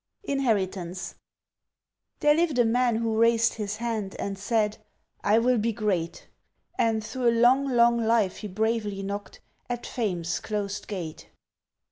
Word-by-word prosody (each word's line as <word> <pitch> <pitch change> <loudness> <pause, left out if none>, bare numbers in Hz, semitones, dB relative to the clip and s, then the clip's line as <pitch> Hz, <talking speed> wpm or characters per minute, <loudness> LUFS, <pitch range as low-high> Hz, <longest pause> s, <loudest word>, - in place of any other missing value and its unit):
Inheritance 190 - -1 1.1
THERE 295 0 +5
lived 320 -3 +1
a 240 - +5
man 240 +1 +2
who 225 -1 0
raised 230 0 +4
his 210 -2 -4
hand 220 -4 -3
and 200 0 -3
said, 210 +1 0 0.4
"I 210 +2 +4
will 245 +1 +3
be 230 +2 +1
great!" 200 -7 -2 0.5
And 220 -1 +1
through 250 +1 0
a 230 0 +1
long, 260 +4 +5
long 235 -2 +4
life 225 -4 +2
he 210 - -6
bravely 210 0 -1
knocked 200 +1 -6 0.3
At 240 -1 -3
Fame's 175 -8 -2
closed 205 -1 -4
gate. 175 -6 -6
220 Hz, 140 wpm, -26 LUFS, 200-235 Hz, 1.1 s, THERE